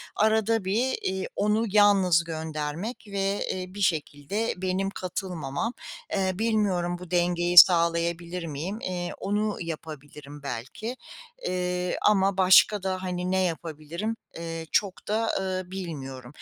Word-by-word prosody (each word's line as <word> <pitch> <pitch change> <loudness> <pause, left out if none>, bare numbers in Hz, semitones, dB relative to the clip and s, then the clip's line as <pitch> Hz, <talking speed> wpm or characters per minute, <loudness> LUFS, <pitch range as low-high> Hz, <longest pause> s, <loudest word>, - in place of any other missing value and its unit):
arada 220 -1 +2
bir, 230 +7 +1
iii, 190 0 -2
onu 210 +2 +2
yalnız 195 -4 +5
göndermek 160 +5 -4
ve, 200 0 -1
eee, 185 -1 -2
bir 200 +2 -8
şekilde 165 +5 -1
benim 185 +1 -1
katılmamam. 185 - -4 0.4
Eee, 190 -1 +1
bilmiyorum 200 -6 +1
bu 180 0 -11
dengeyi 175 0 +1
sağlayabilir 170 0 +5
miyim, 165 +8 -4
eee, 175 -1 -3
onu 210 +1 -1
yapabilirim 150 -3 -8
belki, 140 - -5 0.5
eee, 180 0 -1
ama 195 -2 +3
başka 190 +2 +6
da, 185 -1 -2
hani, 180 0 -2
ne 190 - +2
yapabilirim, 170 +5 -3 0.2
eee, 165 -1 -5
çok 195 -3 0
da, 220 +2 +1
ııı, 185 -1 -3
bilmiyorum. 135 -9 -6
180 Hz, 125 wpm, -26 LUFS, 165-200 Hz, 0.5 s, başka